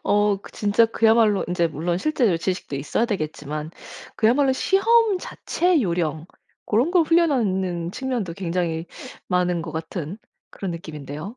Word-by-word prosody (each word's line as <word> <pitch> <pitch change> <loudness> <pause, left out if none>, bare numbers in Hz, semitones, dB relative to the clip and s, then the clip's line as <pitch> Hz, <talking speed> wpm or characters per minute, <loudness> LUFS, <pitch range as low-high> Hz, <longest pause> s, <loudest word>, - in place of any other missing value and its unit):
어 205 -1 +2
그 - - -12
진짜 210 +2 +3
그야말로 225 -2 +3
인제 175 -1 +1
물론 170 +4 -2
실제 250 - +1
이 - - -1
지식도 180 -5 -3
있어야 150 - 0
되겠지만 155 - -4 0.5
그야말로 265 +5 +3
시험 415 - +3
자체 355 -2 0
요령 170 -3 -1 0.4
고런 240 +10 +1
걸 355 -2 +4
훈련하는 195 - +1
측면도 245 -8 -3
굉장히 170 -3 -2 0.4
많은 180 -1 +1
거 165 - -7
같은 160 +2 -5 0.3
그런 195 -3 -5
느낌인데요. 160 - -7
190 Hz, 315 characters per minute, -23 LUFS, 165-235 Hz, 0.5 s, 걸